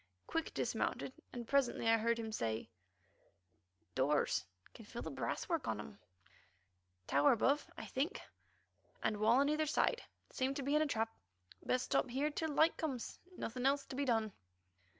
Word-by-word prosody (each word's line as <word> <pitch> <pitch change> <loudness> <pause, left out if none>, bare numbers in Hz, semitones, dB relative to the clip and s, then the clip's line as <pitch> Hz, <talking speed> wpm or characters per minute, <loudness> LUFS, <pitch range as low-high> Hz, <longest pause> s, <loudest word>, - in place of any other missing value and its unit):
Quick 325 -1 -2
dismounted, 260 - -1 0.2
and 240 -2 -6
presently 270 -4 +2
I 225 0 +5
heard 230 +1 +2
him 225 -1 -4
say: 110 - -2 1.2
"Doors. 145 +6 +2 0.3
Can 225 - -11
feel 235 +3 -7
the - - -4
brasswork 335 -5 -2
on 110 - 0
them. 105 -1 -8 1.1
Tower 140 +5 +5
above, 275 +6 +2
I - - -6
think, 295 +9 -1 0.8
and 215 - +1
wall 225 +5 +5
on 285 - +3
either 305 +1 +1
side. 475 +10 +2 0.3
Seem 265 +1 0
to 280 - -2
be 280 +3 +1
in 305 - +5
a 310 - +2
trap. 225 -4 -1 0.5
Best 255 0 +1
stop 275 -1 +1
here 280 +5 0
till 320 +2 -2
light 315 +3 +4
comes. 270 -7 -3 0.2
Nothing 250 +3 -1
else 280 0 +2
to - - -7
be 280 +1 0
done." 225 -5 +1
255 Hz, 165 wpm, -37 LUFS, 225-285 Hz, 1.2 s, I